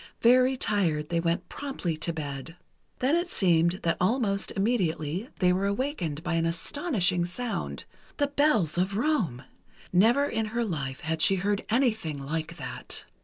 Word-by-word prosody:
Very 255 Hz, +2 st, +5 dB
tired, 170 Hz, -10 st, 0 dB
they 170 Hz, -1 st, +1 dB
went 170 Hz, +2 st, -1 dB
promptly 270 Hz, -, -4 dB
to 165 Hz, +2 st, -1 dB
bed. 145 Hz, 0 st, -6 dB, 0.5 s
Then 270 Hz, +5 st, +3 dB
it 345 Hz, +1 st, 0 dB
seemed 170 Hz, -, +2 dB
that 165 Hz, -, +1 dB
almost 200 Hz, -1 st, +1 dB
immediately 190 Hz, -, 0 dB
they 180 Hz, -1 st, +3 dB
were 195 Hz, +2 st, 0 dB
awakened 200 Hz, -, -2 dB
by 175 Hz, -2 st, -1 dB
an 165 Hz, 0 st, +1 dB
astonishing 180 Hz, -, 0 dB
sound—the 245 Hz, -, -4 dB
bells 240 Hz, -, +2 dB
of 190 Hz, +2 st, 0 dB
Rome! 215 Hz, -, 0 dB, 0.5 s
Never 235 Hz, +10 st, +5 dB
in 225 Hz, -5 st, -1 dB
her 235 Hz, -, +1 dB
life 140 Hz, -9 st, -4 dB
had 160 Hz, +1 st, -2 dB
she 195 Hz, -, +6 dB
heard 200 Hz, +2 st, 0 dB
anything 220 Hz, -, +1 dB
like 155 Hz, +3 st, -4 dB
that. -, -, -5 dB
185 Hz, 150 wpm, -27 LUFS, 165-240 Hz, 0.5 s, she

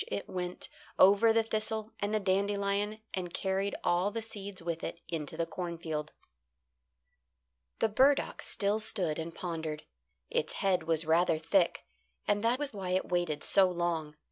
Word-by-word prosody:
it 100 Hz, -, -4 dB
went 180 Hz, -1 st, -3 dB, 0.3 s
over 205 Hz, +4 st, +7 dB
the 225 Hz, 0 st, +3 dB
thistle 220 Hz, 0 st, -1 dB
and 205 Hz, +1 st, -1 dB
the 215 Hz, -, +2 dB
dandelion 200 Hz, +1 st, 0 dB, 0.2 s
and 180 Hz, -2 st, -3 dB
carried 195 Hz, +1 st, -1 dB
all 175 Hz, +3 st, +2 dB
the 225 Hz, +2 st, -4 dB
seeds 200 Hz, -3 st, -6 dB
with 165 Hz, -1 st, -4 dB
it -, -, -4 dB
into 155 Hz, -4 st, -4 dB
the 165 Hz, -, 0 dB
cornfield. 165 Hz, -4 st, -4 dB, 1.7 s
The -, -, +2 dB
burdock 270 Hz, +6 st, +3 dB
still 205 Hz, +2 st, +1 dB
stood 190 Hz, -8 st, +1 dB
and 165 Hz, +1 st, -5 dB
pondered. 160 Hz, -3 st, -4 dB, 0.5 s
Its -, -, 0 dB
head 190 Hz, -2 st, +1 dB
was 165 Hz, -1 st, +1 dB
rather 165 Hz, +1 st, +3 dB
thick, 170 Hz, +3 st, +2 dB, 0.4 s
and 205 Hz, +1 st, +2 dB
that 235 Hz, +2 st, +3 dB
was 290 Hz, -2 st, -2 dB
why 195 Hz, -3 st, -4 dB
it -, -, -4 dB
waited 175 Hz, -4 st, 0 dB
so 195 Hz, -2 st, +5 dB
long. 170 Hz, -4 st, -2 dB
185 Hz, 155 wpm, -31 LUFS, 165-205 Hz, 1.7 s, over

